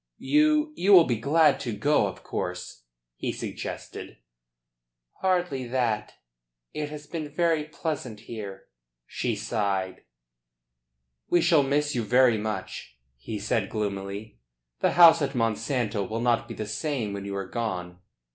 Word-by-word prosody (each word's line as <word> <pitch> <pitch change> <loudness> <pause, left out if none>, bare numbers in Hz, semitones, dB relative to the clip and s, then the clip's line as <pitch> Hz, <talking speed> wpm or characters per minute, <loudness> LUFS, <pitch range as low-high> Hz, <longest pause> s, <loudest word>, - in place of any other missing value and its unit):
"You 305 0 +2
you 195 +3 +3
will 180 -3 +10
be 120 -7 -1
glad 150 +4 +4
to 120 -4 -3
go, 145 +8 +3
of - - -9
course?" - - -5 0.3
he - - -2
suggested. - - -7 1.0
"Hardly 175 -9 0
that. 115 -4 -1 0.6
It 150 -1 -3
has 150 0 -8
been 155 -1 -5
very 160 0 +1
pleasant 150 -8 -5
here." 105 -4 -8 0.4
She - - -2
sighed. 100 -4 -2 1.3
"We 175 - +4
shall 165 -3 +5
miss 145 +2 +1
you 120 - 0
very 120 0 +4
much," 105 - -5 0.2
he 65 - -6
said 105 0 -1
gloomily. 100 - -4 0.4
"The - - +2
house 165 -2 +8
at 140 -1 -1
Monsanto 115 -1 0
will 110 +1 -2
not 120 -1 +1
be - - -7
the 110 - -4
same 115 -2 -2
when 100 0 -5
you 100 0 -4
are 100 0 -3
gone. 90 -6 -4
120 Hz, 140 wpm, -26 LUFS, 105-150 Hz, 1.3 s, will